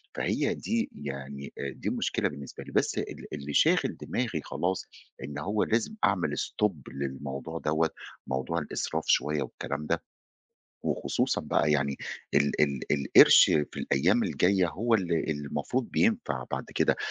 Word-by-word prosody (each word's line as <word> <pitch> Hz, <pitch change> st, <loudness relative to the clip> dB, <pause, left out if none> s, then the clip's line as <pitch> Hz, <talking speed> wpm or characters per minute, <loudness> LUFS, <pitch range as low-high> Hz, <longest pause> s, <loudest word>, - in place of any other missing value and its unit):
فهي -, -, 0 dB
دي 230 Hz, +1 st, -1 dB
يعني، 70 Hz, -1 st, -7 dB
آآ، 70 Hz, -, -3 dB
دي -, -, -6 dB
المشكلة -, -, 0 dB
بالنسبة 70 Hz, -2 st, -8 dB
لي. -, -, -11 dB
بس -, -, +1 dB
ال -, -, -4 dB
اللي 70 Hz, +1 st, -5 dB
شاغِل -, -, +3 dB
دماغي 110 Hz, -11 st, -2 dB
خلاص 90 Hz, +2 st, -2 dB, 0.4 s
إن 70 Hz, +2 st, -6 dB
هو 105 Hz, +7 st, 0 dB
لازم 115 Hz, -, 0 dB
أعمل 95 Hz, -3 st, +2 dB
stop 105 Hz, -1 st, 0 dB, 0.2 s
للموضوع 70 Hz, +3 st, -5 dB
دوّة، 80 Hz, +1 st, +1 dB, 0.4 s
موضوع 65 Hz, +6 st, -1 dB
الإسراف 75 Hz, -, -3 dB
شوية 75 Hz, 0 st, +2 dB
والكلام 70 Hz, +2 st, -5 dB
ده، 85 Hz, +2 st, -1 dB, 0.8 s
وخصوصًا -, -, 0 dB
بقى 75 Hz, -, +1 dB
يعني 70 Hz, -2 st, +1 dB, 0.4 s
ال 70 Hz, 0 st, +2 dB
ال 70 Hz, -3 st, +1 dB
القِرش 70 Hz, -2 st, +8 dB
في 75 Hz, -1 st, 0 dB
الأيام 70 Hz, -, +2 dB
الجايّة 95 Hz, -1 st, +2 dB
هو 115 Hz, +9 st, 0 dB
ال 85 Hz, -6 st, +1 dB
المفروض 75 Hz, -, -2 dB
بينفَع 230 Hz, 0 st, +1 dB
بعد -, -, -2 dB
كده، -, -, +3 dB
75 Hz, 145 wpm, -28 LUFS, 70-95 Hz, 0.8 s, القِرش